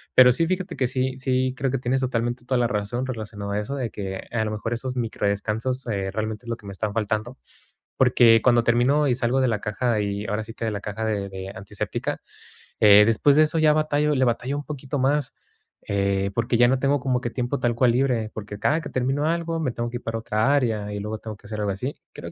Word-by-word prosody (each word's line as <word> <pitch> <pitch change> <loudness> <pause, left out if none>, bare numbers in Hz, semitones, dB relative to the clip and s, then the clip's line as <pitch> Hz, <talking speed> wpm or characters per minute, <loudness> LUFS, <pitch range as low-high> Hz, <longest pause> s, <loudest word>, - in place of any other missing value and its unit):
pero 125 -1 +8
sí, 165 +7 +1
fíjate 185 -1 -2
que 130 - +1
sí 130 +1 -1
sí 130 -1 0
creo 135 -1 0
que 135 - 0
tienes 130 +2 0
totalmente 120 0 -1
toda 130 0 +1
la 120 - +3
razón 110 +3 -2
relacionado 110 -5 -5
a 105 - 0
eso, 105 +7 -4
de 125 -5 -3
que, 95 -2 -5
a 110 -2 0
lo - - -2
mejor, 110 +2 -3
esos 125 +2 -4
micro 115 -4 -1
descansos, 110 +6 -2
eh, 100 -3 -2
realmente 110 +2 -4
es - - -8
lo 115 - -2
que - - -18
me 100 - -6
están 105 +2 -2
faltando, 110 +3 -2 0.6
porque 120 -3 +5
cuando 120 -2 +4
termino 125 +6 +3
y 125 - +3
salgo 125 +1 +1
de 130 - +3
la 105 -3 -1
caja 110 +1 0
y, 100 0 -2
ahora 105 +1 -2
sí 115 - -10
que, 115 - -5
de 110 - -1
la 100 - -4
caja 105 +2 -4
de 105 -3 -1
de 95 0 -7
antiséptica, 100 0 -4 0.6
eh, 105 0 +8
después 115 +6 +4
de 155 - +7
eso 155 +1 +1
ya 155 -1 +5
batallo, 150 -1 +1
le 130 - +2
batallo 125 +3 -1
un 145 - -4
poquito 140 -1 -4
más, 140 +1 +1 0.5
eh, 100 -1 0
porque 115 0 +1
ya 120 - +6
no 130 - +3
tengo 140 +1 +2
como 125 -1 0
que 120 - -2
tiempo 125 +3 -2
tal 120 -1 +1
cual 125 +1 +3
libre, 120 -3 +1
porque 105 -1 -7
cada 155 +3 +1
que - - -7
termino 135 +3 0
algo, 165 0 -1
me 135 -6 -1
tengo 120 0 -3
que 120 - -4
ir - - -14
para 115 0 -3
otra 110 +4 +1
área, 110 -6 0
y 105 - -4
luego 105 +2 -4
tengo 110 -2 -7
que 105 - -16
hacer 105 0 -5
algo 100 -1 0
así, 125 +9 -5
creo - - -8
120 Hz, 245 wpm, -24 LUFS, 105-130 Hz, 0.6 s, pero